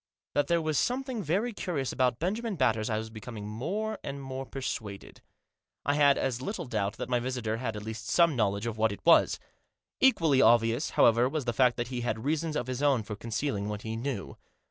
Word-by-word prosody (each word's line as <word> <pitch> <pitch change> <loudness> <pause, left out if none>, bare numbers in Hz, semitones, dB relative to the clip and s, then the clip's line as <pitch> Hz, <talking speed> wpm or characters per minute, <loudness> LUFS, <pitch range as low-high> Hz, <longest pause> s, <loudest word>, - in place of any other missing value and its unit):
That 145 - +1
there 170 -1 +2
was 155 -2 +1
something 255 -2 -1
very 200 +8 0
curious 155 -10 -2
about 125 -2 +1
Benjamin 210 - -2
Batters 110 -8 +1
I 110 - 0
was 110 0 -5
becoming 110 -1 -8
more 205 - -3
and 140 0 -5
more 135 -1 -6
persuaded. 110 -7 -6 0.6
I 140 - +2
had 145 -1 +5
as 130 -2 -1
little 185 +2 -4
doubt 105 -5 -1
that - - -4
my 125 -1 +1
visitor 120 -3 -2
had 115 -2 -3
at 105 - -6
least 110 0 -6
some 170 +2 +4
knowledge 100 -2 0
of 115 -2 -4
what 110 0 +3
it 100 - -9
was. 170 - +5 0.6
Equally 165 - +4
obvious, 115 +3 +4
however, 120 +2 +5
was 150 -2 -3
the 120 - 0
fact 125 0 +3
that 120 0 -3
he 125 -2 -3
had 110 -1 -3
reasons 155 +1 0
of 125 - -1
his 130 +1 -4
own 140 -6 +3
for 105 0 -6
concealing 110 -1 -2
what 105 0 -5
he 110 0 -4
knew. 115 - -4
125 Hz, 210 wpm, -29 LUFS, 110-150 Hz, 0.6 s, had